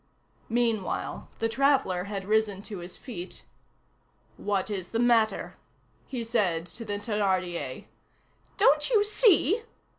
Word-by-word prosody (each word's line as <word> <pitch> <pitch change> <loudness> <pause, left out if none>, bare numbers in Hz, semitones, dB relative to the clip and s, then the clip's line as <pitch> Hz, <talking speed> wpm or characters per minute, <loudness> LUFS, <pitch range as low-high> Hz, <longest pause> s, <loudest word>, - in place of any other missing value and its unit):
Meanwhile, 230 -4 -1
the 225 - 0
traveller 230 -7 +2
had 200 -1 -5
risen 210 -2 +1
to 210 -4 -7
his 175 +1 -7
feet. 190 -8 -8 0.9
"What 205 0 -1
is 190 -3 -3
the 225 - -3
matter?" 230 -2 +2 0.5
he 250 -3 -4
said 200 -8 0
to 225 +7 -9
the 210 -2 -4
Thénardier. 190 - -1 0.7
"Don't 450 +5 +4
you 435 -4 +4
see?" 420 - +4
215 Hz, 120 wpm, -28 LUFS, 190-245 Hz, 0.9 s, Don't